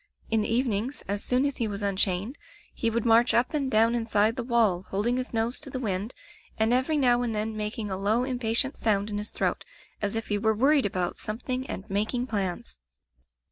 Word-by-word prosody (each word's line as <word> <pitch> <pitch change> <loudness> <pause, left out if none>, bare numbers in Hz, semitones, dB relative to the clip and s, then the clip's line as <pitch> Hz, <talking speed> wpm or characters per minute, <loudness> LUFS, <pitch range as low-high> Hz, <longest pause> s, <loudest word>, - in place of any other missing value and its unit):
In 220 -1 +3
the 210 - -2
evenings, 240 +1 0
as 200 +1 -2
soon 255 +2 +2
as 280 -2 -1
he 230 - 0
was 205 0 -5
unchained, 200 +4 0 0.3
he 230 - 0
would 230 0 -1
march 230 +1 +4
up 240 +5 +2
and 280 -3 0
down 225 0 +4
inside 225 -2 +1
the 250 - -3
wall, 230 -7 +2
holding 225 +6 0
his 255 0 -3
nose 230 +2 0
to 295 - -8
the 260 - -4
wind 210 -1 -2 0.4
and 220 +2 +2
every 260 +5 +2
now 245 -3 +3
and 235 -3 -2
then 215 +1 -2
making 210 0 -3
a 190 - -2
low 215 +6 +1
im 255 -2 -3
patient 240 +4 +1
sound 210 -1 0
in 205 - -2
his 210 - -3
throat, - - -2 0.4
as 205 +1 -1
if 225 - -2
he 205 -1 +1
were 220 +1 +1
wor 260 +7 +3
ried 285 -8 +4
about 180 -2 -2
something 255 +4 -3
and 195 - -5
making 215 +5 -1
plans. 190 - -3
225 Hz, 220 wpm, -27 LUFS, 205-250 Hz, 0.4 s, march